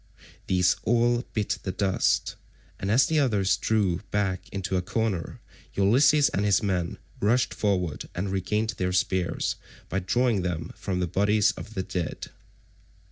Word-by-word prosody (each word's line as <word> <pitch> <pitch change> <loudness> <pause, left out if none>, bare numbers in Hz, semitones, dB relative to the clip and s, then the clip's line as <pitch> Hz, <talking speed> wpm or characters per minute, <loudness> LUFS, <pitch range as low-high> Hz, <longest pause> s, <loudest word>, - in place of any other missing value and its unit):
These 90 -1 +3
all 120 +2 +2
bit 105 -2 -1
the 95 - -3
dust, 95 0 +1 0.4
and 95 - -3
as 125 +6 +5
the 155 +1 +1
others 100 -8 +2
drew 100 -6 +1
back 100 -3 -1
into 95 -1 -3
a 90 - +2
corner 100 -2 -2 0.4
Ulysses 135 +9 +5
and 100 - -1
his 105 +1 +3
men 90 -4 -1 0.2
rushed 120 +5 +2
forward 90 -7 -1
and 95 +2 -2
regained 105 +4 0
their 90 0 0
spears 90 0 0 0.3
by 95 - 0
drawing 115 +2 +1
them 90 -2 -3
from 90 -1 -3
the - - +2
bodies 105 +4 +3
of 110 - -10
the 95 - -1
dead. 90 -3 -4
100 Hz, 150 wpm, -26 LUFS, 90-110 Hz, 0.4 s, as